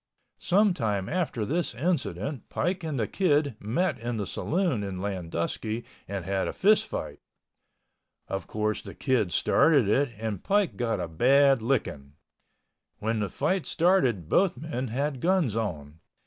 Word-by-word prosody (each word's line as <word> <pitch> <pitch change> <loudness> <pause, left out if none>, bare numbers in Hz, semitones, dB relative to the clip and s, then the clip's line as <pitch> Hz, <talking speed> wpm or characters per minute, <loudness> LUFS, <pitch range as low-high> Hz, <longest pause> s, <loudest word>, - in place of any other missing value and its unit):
Some 200 +1 +3
time 105 - -1
after 155 -11 -1
this 165 0 -1
incident 140 - -2
Pike 180 0 -1
and 155 -5 -2
the 110 - +1
Kid 145 - +1
met 125 - -1
in 120 0 -3
the 105 - -2
saloon 170 - -1
in 95 -2 -4
Landusky 95 +4 -3 0.2
and 95 -3 -4
had 95 0 -1
a - - -3
fist 210 +2 +3
fight. - - -5 1.1
Of 95 -3 -4
course 110 0 -1
the - - -10
Kid 120 -9 +1
started 140 - +4
it 135 +7 +2
and 110 -3 -4
Pike 205 -2 +1
got 115 -4 -1
a 90 - -2
bad 135 - +4
licking. 105 - -2 0.8
When 110 +1 -1
the 105 -2 -1
fight 185 - -1
started 135 - +2
both 185 - +2
men 130 -3 -4
had 135 +3 -2
guns 175 - +2
on. 80 -9 -4
120 Hz, 150 wpm, -27 LUFS, 100-160 Hz, 1.1 s, started